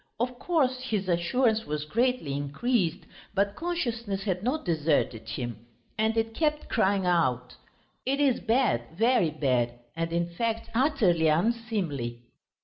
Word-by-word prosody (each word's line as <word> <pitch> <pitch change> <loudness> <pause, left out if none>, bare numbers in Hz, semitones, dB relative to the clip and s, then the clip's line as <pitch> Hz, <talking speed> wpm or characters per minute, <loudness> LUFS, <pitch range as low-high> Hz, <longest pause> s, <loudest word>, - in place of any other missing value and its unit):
Of 250 +1 -2
course 270 -7 +1
his 215 -7 -2
assurance 220 +6 +1
was 150 0 -2
greatly 235 - 0
increased, 170 - -1 0.3
but 200 +1 +1
consciousness 235 - -2
had 185 -3 -1
not 260 +8 -1
deserted 150 - 0
him, 120 -2 -5 0.3
and 220 +1 +1
it 225 0 0
kept 300 +3 0
crying 200 -4 +2
out: 125 -8 +1 0.5
"It 275 +2 0
is 275 -4 +3
bad, 235 - +2 0.2
very 230 -6 +3
bad 130 -6 +1 0.2
and, 165 0 -2
in 170 0 0
fact, 230 +3 -2
utterly 225 - +3
unseemly!" 165 - 0
200 Hz, 135 wpm, -28 LUFS, 155-245 Hz, 0.5 s, is